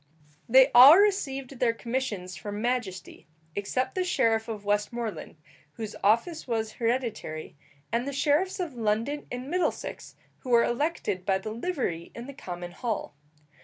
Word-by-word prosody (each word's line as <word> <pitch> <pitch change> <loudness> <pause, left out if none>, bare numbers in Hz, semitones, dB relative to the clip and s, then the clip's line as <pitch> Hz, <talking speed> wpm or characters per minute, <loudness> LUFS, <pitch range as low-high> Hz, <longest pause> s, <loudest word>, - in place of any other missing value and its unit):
They 260 +3 +7
all 265 +7 +10
received 275 -11 0
their 230 -2 +2
commissions 225 -8 -3
from 205 +3 -6
majesty, 225 -6 -3 0.3
except 255 +6 -1
the 370 - 0
sheriff 230 -10 +1
of 215 -3 -6
Westmoreland, 210 +2 -2 0.4
whose 220 -2 -6
office 235 - +2
was 220 -2 -1
hereditary, 230 -10 -3 0.4
and 235 +4 0
the - - -2
sheriffs 300 +8 +1
of 345 -6 -3
London 230 +5 -1
and 250 +1 -5
Middlesex, 355 +4 -2 0.2
who 255 - -9
were 235 -1 +5
elected 240 - -1
by 190 0 +2
the 215 +3 -6
livery 230 - -3
in 235 - -7
the 280 - -8
common 175 -8 -7
hall. 220 - -4
235 Hz, 145 wpm, -27 LUFS, 210-270 Hz, 0.4 s, all